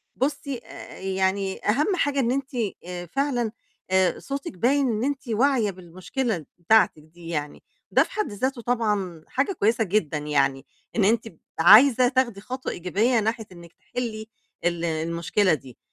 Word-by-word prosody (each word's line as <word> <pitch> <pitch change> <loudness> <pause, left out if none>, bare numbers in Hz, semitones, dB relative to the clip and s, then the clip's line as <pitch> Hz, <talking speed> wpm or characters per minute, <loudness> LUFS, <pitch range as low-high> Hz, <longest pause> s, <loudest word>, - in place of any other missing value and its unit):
بُصّي، 280 0 -2
آآ، - - -11
يعني 190 0 -1
أهم 300 - +2
حاجة 285 -5 0
إن 240 -2 +2
أنتِ 270 0 -2 0.6
فعلًا 250 -5 0 0.4
آآ، 190 -1 +3
صوتِك 275 -5 -5
باين 270 +6 +2
إن 220 +1 -1
أنتِ 280 -1 -2
واعية 235 -2 +2
بالمشكلة 185 - -4
بتاعتِك 175 -4 +3
دي 165 +2 -14
يعني، 150 -3 -4 0.3
ده - - +5
في - - -13
حد 425 - -2
ذاته 250 +4 -2
طبعًا 210 -9 -1
حاجة 275 +9 0
كويسة 225 +2 +3
جدًا 180 -6 0
يعني، 140 -2 0 0.3
إن 220 - +2
أنتِ 225 +2 +2 0.3
عايزة 245 +8 +8
تاخدي 245 -5 0
خطوة 255 +4 -5
إيجابية 210 +7 +1
ناحية 220 +1 -1
إنك 170 -1 -13
تِحلّي 220 -3 -5 0.4
ال 170 -1 0
المشكلة 170 +4 +1
دي. 135 -5 -6
215 Hz, 145 wpm, -25 LUFS, 175-255 Hz, 0.6 s, عايزة